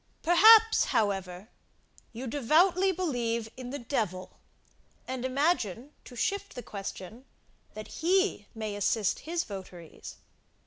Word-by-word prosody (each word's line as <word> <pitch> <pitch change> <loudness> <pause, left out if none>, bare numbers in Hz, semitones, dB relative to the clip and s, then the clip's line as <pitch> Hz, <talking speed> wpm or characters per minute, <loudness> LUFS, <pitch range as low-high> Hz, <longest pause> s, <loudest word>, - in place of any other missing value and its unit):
Perhaps, 440 +6 +7
however, 195 -3 -1 0.6
you 240 +3 -7
devoutly 335 +9 +3
believe 240 -11 -2
in 255 -1 -8
the 280 - -4
devil, 215 -8 -4 0.7
and 255 -1 -4
imagine, 260 - -1
to 250 - -12
shift 400 - -2
the 245 - -7
question, 200 +3 -8 0.5
that 215 0 -8
he 370 - 0
may 215 -2 -4
assist 205 0 0
his 340 0 0
votaries? 180 -4 -10
245 Hz, 115 wpm, -29 LUFS, 205-340 Hz, 0.7 s, Perhaps